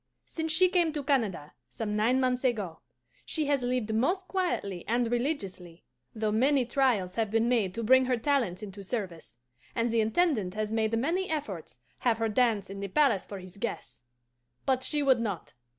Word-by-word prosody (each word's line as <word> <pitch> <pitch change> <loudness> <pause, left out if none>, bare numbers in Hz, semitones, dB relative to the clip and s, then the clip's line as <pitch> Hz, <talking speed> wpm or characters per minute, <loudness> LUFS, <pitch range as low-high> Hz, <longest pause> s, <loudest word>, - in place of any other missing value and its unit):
Since 320 -1 -3
she 370 +4 +5
came 350 -3 +2
to 295 -2 -3
Canada, 220 - 0 0.2
some 210 -2 -3
nine 230 +5 +3
months 255 -1 +1
ago, 210 -10 -1 0.4
she 310 -2 -1
has 285 -2 +1
lived 245 -3 -1
most 360 - +1
quietly 270 - -2
and 235 +1 +1
religiously, 195 - -3 0.3
though 215 -1 0
many 260 +4 +3
trials 235 -8 +1
have 220 0 -1
been 225 +2 +2
made 220 -7 +1
to 230 - -3
bring 260 +3 +5
her 250 -1 +1
talents 230 -7 0
into 200 -1 -8
service; 185 - -5 0.4
and 230 0 +1
the 230 -1 +3
Intendant 220 - +1
has 215 0 -2
made 225 0 +1
many 340 +10 0
efforts 210 - -4 0.2
have 235 -3 +2
her 225 0 0
dance 215 -3 +2
in 195 +1 -7
the 200 - -3
palace 240 -2 +2
for 200 - -6
his 185 0 -11
guests. 125 -10 -5 0.6
But 260 -1 +2
she 295 +2 0
would 265 -3 +4
not. 205 - -4
230 Hz, 180 wpm, -29 LUFS, 200-270 Hz, 0.6 s, she